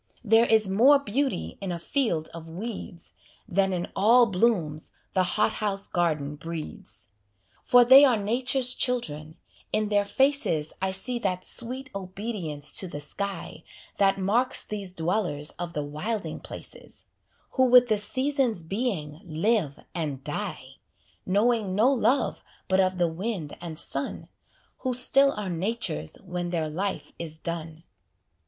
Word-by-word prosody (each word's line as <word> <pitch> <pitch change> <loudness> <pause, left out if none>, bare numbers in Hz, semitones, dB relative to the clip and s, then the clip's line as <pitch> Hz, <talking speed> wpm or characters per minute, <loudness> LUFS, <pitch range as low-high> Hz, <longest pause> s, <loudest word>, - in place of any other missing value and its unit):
There 225 +1 +5
is 220 -2 +4
more 240 +10 +6
beauty 265 - -2
in 195 -2 -3
a 175 - -2
field 170 - -1
of 165 -1 -9
weeds 185 -1 -5 0.3
Than 195 -1 +1
in 175 -1 -2
all 235 +5 +6
blooms 180 -7 0 0.2
the 190 - +3 0.2
hothouse 210 -2 +1
garden 150 -5 -1
breeds. 165 -9 -6 0.5
For 245 -1 +6
they 265 +3 +9
are 255 -5 +5
nature's 250 +4 +2
children; 160 - -1 0.3
in 215 -1 0
their 205 -1 +3
faces 235 - +1
I 190 - +1
see 240 +6 0
that 185 -4 -2
sweet 260 +3 0
obedience 185 -6 -3
to 190 - -4
the 145 - -6
sky 185 +2 -4 0.3
That 195 -1 +3
marks 220 +7 +1
these 200 -3 -5
dwellers 165 -3 -1
of 175 -1 -4
the 150 - -2
wilding 195 +9 -4
places, - - -9 0.5
Who 260 - +3
with 250 0 +7
the 215 -2 +2
season's 260 - +1
being 170 -6 -3
live 170 -2 0
and 145 -6 -4
die; 145 -4 -5 0.5
Knowing 205 0 +2
no 230 +6 +4
love 265 +1 +1 0.2
but 190 0 +2
of 185 -1 +2
the 175 -1 +2
wind 170 -2 -4
and 165 -3 -7
sun, 140 -1 -2 0.5
Who 255 -2 -1
still 275 +2 +4
are 210 -2 -4
nature's 170 - -1
when 180 -2 -4
their 165 -3 -1
life 190 +5 -3
is 160 -2 -5
done. 165 -1 -6
195 Hz, 140 wpm, -26 LUFS, 165-235 Hz, 0.5 s, they